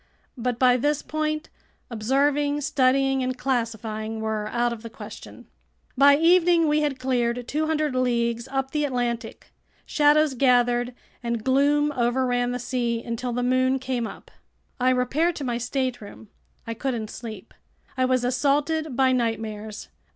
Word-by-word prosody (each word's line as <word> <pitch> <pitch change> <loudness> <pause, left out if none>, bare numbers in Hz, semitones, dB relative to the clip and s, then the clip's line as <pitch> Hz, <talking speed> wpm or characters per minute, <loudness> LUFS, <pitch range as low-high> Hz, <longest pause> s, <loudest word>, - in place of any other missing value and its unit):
But 245 -1 -2
by 250 0 +4
this 290 +3 0
point 310 0 -2 0.4
observing, 285 +6 +1
studying, 270 0 +2
and 255 0 -2
classifying 225 -3 -2
were 220 -1 -2
out 240 +1 0
of 225 - -9
the 230 - -8
question. 220 - -11 0.5
By 280 +1 +6
evening 340 0 +4
we 300 0 +2
had 290 -3 -1
cleared 245 -2 -1
200 310 -1 0
leagues 235 -1 0
up 270 0 -2
the 300 -1 0
Atlantic. 245 -4 -3 0.3
Shadows 300 -1 +3
gathered 245 -1 +2 0.3
and 235 -2 -3
gloom 285 +3 +3
overran 245 0 +1
the 245 - -2
sea 240 -2 -2
until 235 +1 -3
the 245 +1 -1
moon 255 +1 +2
came 255 -3 -2
up. - - -12 0.5
I 250 +1 +3
repaired 265 +7 +1
to 290 - -5
my 240 -2 -2
stateroom. 245 -4 -4 0.4
I 230 - -4
couldn't 230 -2 -3
sleep. 220 -5 -9 0.4
I 260 -1 +2
was 255 -1 +1
assaulted 290 +3 0
by 260 0 +3
nightmares. 220 -3 -3
255 Hz, 145 wpm, -24 LUFS, 235-280 Hz, 0.5 s, By